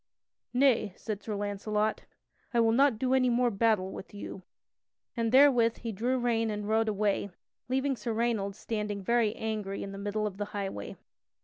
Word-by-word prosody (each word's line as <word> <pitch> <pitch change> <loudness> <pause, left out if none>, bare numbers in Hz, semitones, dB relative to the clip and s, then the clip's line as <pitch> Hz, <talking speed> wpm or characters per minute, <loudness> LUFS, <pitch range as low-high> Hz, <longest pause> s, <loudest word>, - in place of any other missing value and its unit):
"Nay," 245 -7 +3
said 210 -2 -5
Sir 215 - -4
Launcelot, 210 +1 -1 0.5
"I - - +4
will 225 -1 +4
not 265 0 +4
do 255 +3 0
any 255 -1 +4
more 240 0 +2
battle 200 -3 +1
with 200 - -9
you." 200 -1 -7 0.7
And 230 -2 0
therewith 255 -4 +5
he 230 - -3
drew 240 +6 0
rein 230 -2 +1
and 210 -1 -3
rode 220 +1 +2
away, 205 -1 0 0.4
leaving 265 +1 +1
Sir 235 -1 -4
Raynold 220 -3 0
standing 210 -2 -3
very 230 0 +2
angry 215 -3 -3
in 195 - -6
the 195 - -7
middle 205 +1 -2
of 200 -2 -4
the 205 - -2
highway. 195 - -5
220 Hz, 175 wpm, -30 LUFS, 205-240 Hz, 0.7 s, therewith